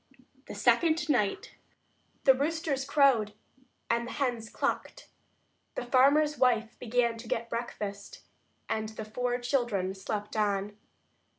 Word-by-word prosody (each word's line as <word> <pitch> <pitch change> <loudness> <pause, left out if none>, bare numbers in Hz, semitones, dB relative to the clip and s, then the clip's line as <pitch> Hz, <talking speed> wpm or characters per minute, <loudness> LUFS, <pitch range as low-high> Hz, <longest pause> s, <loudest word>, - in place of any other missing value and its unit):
THE - - -7
SECOND 300 +9 +2
NIGHT 210 -8 0 0.7
The 265 - +7
roosters 285 0 -1
crowed 270 -7 +3 0.5
and 235 0 0
the - - -6
hens 240 -5 -2
clucked; - - -3 0.7
the - - -3
farmer's 285 +4 +4
wife 230 -3 +2
began 235 -1 +1
to 230 - -10
get 230 +1 -2
breakfast, 205 -4 -5 0.4
and 220 0 -2
the 220 0 -7
four 245 +3 -1
children 240 -7 0
slept 205 +2 -5
on. 205 -1 0
235 Hz, 120 wpm, -29 LUFS, 215-270 Hz, 0.7 s, The